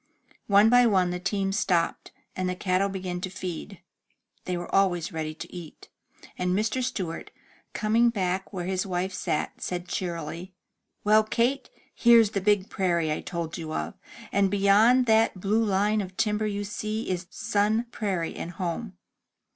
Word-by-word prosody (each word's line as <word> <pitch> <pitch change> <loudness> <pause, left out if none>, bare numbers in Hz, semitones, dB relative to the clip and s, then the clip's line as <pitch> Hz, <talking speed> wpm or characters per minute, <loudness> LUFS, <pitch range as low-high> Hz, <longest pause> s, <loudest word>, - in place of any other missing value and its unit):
One 205 +1 +6
by 245 +1 +6
one 185 -4 +2
the 180 - -3
teams 195 +1 -1
stopped, 170 -3 0 0.2
and 185 0 -1
the 180 - -2
cattle 185 +1 +1
began 185 -2 -4
to 185 - -3
feed 185 0 -6 0.6
(they 180 -1 -2
were 175 - -7
always 180 -5 +2
ready 155 -1 -3
to 160 - -9
eat), 170 -4 -10 0.5
and 180 +1 +1
Mr. 215 +4 0
Stewart, 185 -9 -4 0.4
coming 225 +3 +3
back 190 -3 -2
where 180 -4 -4
his 185 0 -1
wife 185 0 -2
sat, 155 - -2
said 180 0 -4
cheerily: 175 +1 -4 0.5
"Well, 215 +1 +5
Kate, 245 +5 0 0.2
here's 230 -3 +5
the 200 - -1
big 205 -1 +2
prairie 170 -4 0
I 150 - -2
told 170 -2 -4
you 160 -1 -5
of, 75 - -3 0.4
and 200 0 +3
beyond 205 +6 +5
that 220 -4 +3
blue 210 +4 +1
line 210 +1 +2
of 185 -1 -8
timber 215 -1 +1
you 205 -1 -2
see 215 +2 -4
is 180 -1 -3
Sun 220 +1 0
Prairie, 190 -8 -2
and 175 - -6
home.'' 185 +4 -4
195 Hz, 165 wpm, -26 LUFS, 180-215 Hz, 0.6 s, One